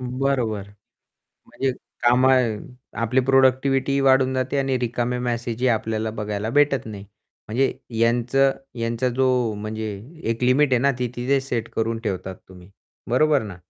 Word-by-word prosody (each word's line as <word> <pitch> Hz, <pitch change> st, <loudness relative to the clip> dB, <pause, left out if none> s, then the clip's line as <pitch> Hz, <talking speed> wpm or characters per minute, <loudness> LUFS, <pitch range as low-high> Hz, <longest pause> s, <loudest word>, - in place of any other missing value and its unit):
अं, 125 Hz, 0 st, -5 dB
बरोबर. 120 Hz, -7 st, -1 dB, 0.8 s
म्हणजे 135 Hz, 0 st, -2 dB, 0.3 s
कामं 125 Hz, -2 st, +4 dB, 0.4 s
आपली 120 Hz, +3 st, +2 dB
प्रोडक्टिविटीही 135 Hz, +1 st, +3 dB
वाढून 130 Hz, -1 st, +3 dB
जाते 130 Hz, +2 st, -1 dB
आणि 135 Hz, -1 st, +1 dB
रिकामे 120 Hz, 0 st, -1 dB
मेसेजही 120 Hz, 0 st, -1 dB
आपल्याला 110 Hz, -1 st, -1 dB
बघायला 105 Hz, 0 st, -3 dB
भेटत 140 Hz, -2 st, +2 dB
नाही. 100 Hz, -3 st, -8 dB, 0.4 s
म्हणजे 130 Hz, +5 st, +1 dB, 0.3 s
यांच 120 Hz, +2 st, +1 dB, 0.5 s
यांचा 115 Hz, +2 st, 0 dB
जो 130 Hz, 0 st, +3 dB, 0.3 s
म्हणजे 110 Hz, +1 st, -5 dB, 0.5 s
एक 115 Hz, +2 st, -3 dB
लिमिट 130 Hz, +2 st, +3 dB
आहे 125 Hz, -, +5 dB
ना 140 Hz, -, +4 dB
ती 125 Hz, -1 st, -1 dB
तिथे 130 Hz, +3 st, +1 dB
सेट 120 Hz, -4 st, -3 dB
करून 115 Hz, 0 st, -1 dB
ठेवतात 95 Hz, -2 st, -3 dB
तुम्ही, 90 Hz, 0 st, -15 dB, 0.4 s
बरोबर 145 Hz, +1 st, +3 dB
ना? 100 Hz, -4 st, -8 dB
125 Hz, 140 wpm, -23 LUFS, 110-130 Hz, 0.8 s, आहे